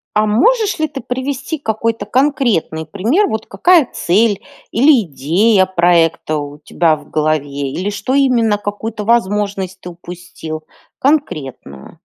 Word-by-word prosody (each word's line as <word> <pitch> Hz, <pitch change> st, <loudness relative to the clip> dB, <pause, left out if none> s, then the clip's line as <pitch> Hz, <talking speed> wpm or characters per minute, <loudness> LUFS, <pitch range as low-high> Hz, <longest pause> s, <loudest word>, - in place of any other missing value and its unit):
А 215 Hz, -, +3 dB
можешь 410 Hz, -, +2 dB
ли 310 Hz, -, +1 dB
ты 275 Hz, -3 st, -7 dB
привести 270 Hz, +4 st, -4 dB
какой-то 225 Hz, -3 st, -2 dB
конкретный 235 Hz, -, 0 dB
пример, 230 Hz, -, +1 dB
вот, 220 Hz, 0 st, -3 dB
какая 345 Hz, -7 st, +3 dB
цель 205 Hz, +3 st, +1 dB, 0.3 s
или 265 Hz, +1 st, +5 dB
идея 185 Hz, -, +2 dB
проекта 170 Hz, -3 st, +2 dB
у 145 Hz, 0 st, -6 dB
тебя 160 Hz, +1 st, +1 dB
в 145 Hz, -1 st, -15 dB
голове, 145 Hz, -3 st, -1 dB
или 185 Hz, +7 st, -3 dB
что 255 Hz, +5 st, -3 dB
именно, 235 Hz, -6 st, +3 dB
какую-то 205 Hz, +1 st, -5 dB
возможность 205 Hz, -4 st, 0 dB
ты 180 Hz, -, -8 dB
упустил, 170 Hz, -2 st, -9 dB, 0.4 s
конкретную? 150 Hz, -, -2 dB
205 Hz, 130 wpm, -16 LUFS, 165-250 Hz, 0.4 s, или